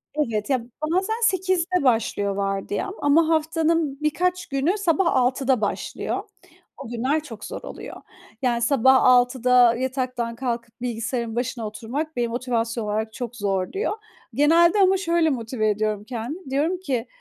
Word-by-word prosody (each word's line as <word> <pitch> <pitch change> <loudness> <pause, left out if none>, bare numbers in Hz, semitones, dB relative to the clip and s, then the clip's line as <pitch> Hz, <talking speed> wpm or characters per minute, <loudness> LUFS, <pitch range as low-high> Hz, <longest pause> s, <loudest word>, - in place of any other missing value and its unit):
Evet, 230 -6 -1
ya 255 -4 +1 0.3
bazen, 385 +5 +1
08.00´de 370 -3 +1
başlıyor 225 -5 +1
vardiyam, 195 - -2
ama 310 +3 +4
haftanın 320 -2 +1
birkaç 360 +4 0
günü, 285 +7 0
sabah 360 -3 +1
06.00´da 260 -1 +2
başlıyor. 205 - -3 0.5
O - - -8
günler 260 +6 0
çok 225 -8 -9
zor - - -6
oluyor. - - -9 0.4
Yani, 240 -2 +1
sabah 265 +1 +4
06.00´da 250 -1 +5
yataktan 250 -2 -2
kalkıp 235 -2 -4
bilgisayarın 235 -1 -3
başına 240 -2 -2
oturmak, 255 +9 -5
beni 240 -1 0
motivasyon 235 -1 -2
olarak 220 +1 -2
çok 245 -1 -6
zorluyor. 200 - -1 0.4
Genelde, 335 +6 +4
ama 385 0 +5
şöyle 335 -3 +2
motive 230 -4 -1
ediyorum 210 0 -1
kendimi. 255 - -6
Diyorum 310 +7 0
ki, 260 -10 -2
255 Hz, 135 wpm, -23 LUFS, 230-315 Hz, 0.5 s, 06.00´da